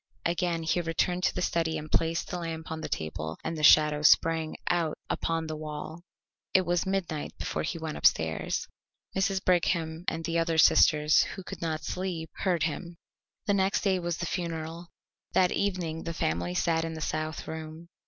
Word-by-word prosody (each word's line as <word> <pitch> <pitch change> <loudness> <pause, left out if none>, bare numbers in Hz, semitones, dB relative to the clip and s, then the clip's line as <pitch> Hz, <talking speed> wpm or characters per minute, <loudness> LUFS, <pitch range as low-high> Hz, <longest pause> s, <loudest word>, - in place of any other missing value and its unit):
Again 170 -1 0
he 160 +2 +1
returned 175 +2 0
to - - +1
the - - -1
study 165 -2 0
and 155 0 -7
placed 165 0 +1
the 180 - -2
lamp 165 -1 -5
on 160 0 -4
the - - -5
table, 80 0 -4
and 165 - -3
the 155 - -4
shadow 150 0 +6
sprang 160 +1 +4
out 170 -3 +1
upon 165 -1 -1
the 155 0 -4
wall. 155 +2 -6 0.5
It 185 -1 +5
was 175 +1 0
midnight 180 -6 -2
before - - -3
he 165 - -3
went 160 -2 -5
upstairs. 80 0 +1 0.5
Mrs. 190 0 0
Brigham 170 -2 +1
and 165 0 -1
the 170 0 0
other 165 -1 0
sisters, 150 -1 +6
who 190 - -8
could - - -8
not 160 -2 -2
sleep, 180 -4 -4
heard 175 -5 +1
him. 170 +2 -3 0.5
The 205 - +2
next 195 0 +2
day 190 -2 +2
was 175 -1 -2
the 175 - -3
funeral. 165 -1 -4 0.5
That 180 -1 +4
evening 175 -5 -1
the 165 -1 -4
family 85 - -1
sat 165 - +1
in 165 0 -4
the 160 - -6
south 155 +1 -3
room. 160 +1 -7
165 Hz, 185 wpm, -28 LUFS, 155-175 Hz, 0.5 s, shadow